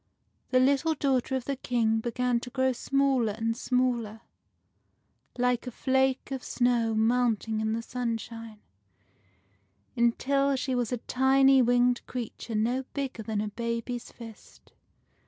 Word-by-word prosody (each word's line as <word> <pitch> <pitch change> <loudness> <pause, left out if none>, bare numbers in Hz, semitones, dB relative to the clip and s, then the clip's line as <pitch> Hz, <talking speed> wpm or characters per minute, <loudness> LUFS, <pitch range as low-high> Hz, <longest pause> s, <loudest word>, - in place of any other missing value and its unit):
The 255 - +3
little 280 +5 +2
daughter 265 -2 0
of 260 - -3
the 275 -1 -2
King 230 -3 +1
began 240 +1 0
to 245 - -8
grow 260 +1 +1
smaller 270 -4 +1
and 225 +1 -2
smaller, 240 -3 -1 1.2
like 250 0 0
a - - -4
flake 265 +2 0
of 265 -2 -4
snow 240 -3 +1
melting 225 -1 +1
in 220 0 -1
the 230 +1 -3
sunshine, 230 -2 -5 1.3
until 275 +4 +2
she 260 0 -2
was 245 -2 -1
a 250 - 0
tiny 265 +2 +4
winged 245 0 +2
creature 235 -2 -6
no 240 +5 0
bigger 270 -5 -3
than 215 -1 -2
a 210 - -3
baby's 235 +2 -4
fist. 225 -3 -14
245 Hz, 135 wpm, -28 LUFS, 230-260 Hz, 1.3 s, tiny